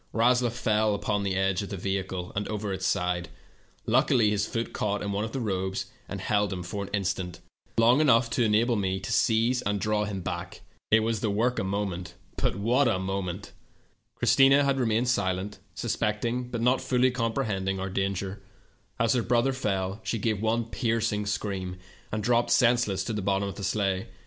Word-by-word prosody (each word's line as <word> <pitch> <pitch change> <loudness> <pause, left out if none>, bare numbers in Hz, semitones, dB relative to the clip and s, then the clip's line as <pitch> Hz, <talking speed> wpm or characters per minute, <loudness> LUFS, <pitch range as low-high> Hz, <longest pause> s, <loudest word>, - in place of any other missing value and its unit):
Rasloff 120 +1 +3
fell 110 -2 +1
upon 100 0 -1
of 95 +1 0
the 100 - -4
vehicle 95 -1 -3
and 100 0 -1
over 105 -2 -3 1.1
Luckily, 115 -4 +3
his 105 0 0
foot 115 -1 -3
caught 105 -1 -1
of 105 +2 -2
the 135 - -3
robes 95 -4 -2 0.2
and - - -4
held 105 -1 +1
him 90 -2 -4
for 100 +4 -4
an - - -10
in 100 -1 0
stant 90 -2 -3 0.4
—long 120 +5 +5
enough 120 -5 +5
to 120 - +2
enable 115 +2 +3
me 95 -2 -1
seize 115 +5 +2
and 105 0 -1
him 105 -2 -1
back, 85 0 -5 0.3
a 110 - +7 0.6
moment! 95 -2 -3 1.7
" - - -42
Christina 135 +1 +5
had 140 -1 +1
remained 115 0 +1
silent, 100 -4 -1 0.2
suspecting, 115 +4 -1
but 120 -2 -3
not 125 +2 +3
fully 125 0 +2
comprehending 110 -6 -1
our 95 0 -3
danger. 95 0 -2 0.6
As 115 -1 +3
her 125 - +2
brother 120 +3 +2
fell 100 -5 -2
she 115 - -1
gave 110 -1 -1
one 115 +1 +1
piercing 115 -3 -1
scream 95 -3 -3 0.3
and 105 0 -2
dropped 120 +1 +2
senseless 115 -6 +3
to 115 - -3
the 105 - -2
bottom 100 +1 0
of 100 - -4
the 100 - -8
sleigh. 95 -1 0
105 Hz, 155 wpm, -27 LUFS, 95-115 Hz, 1.7 s, a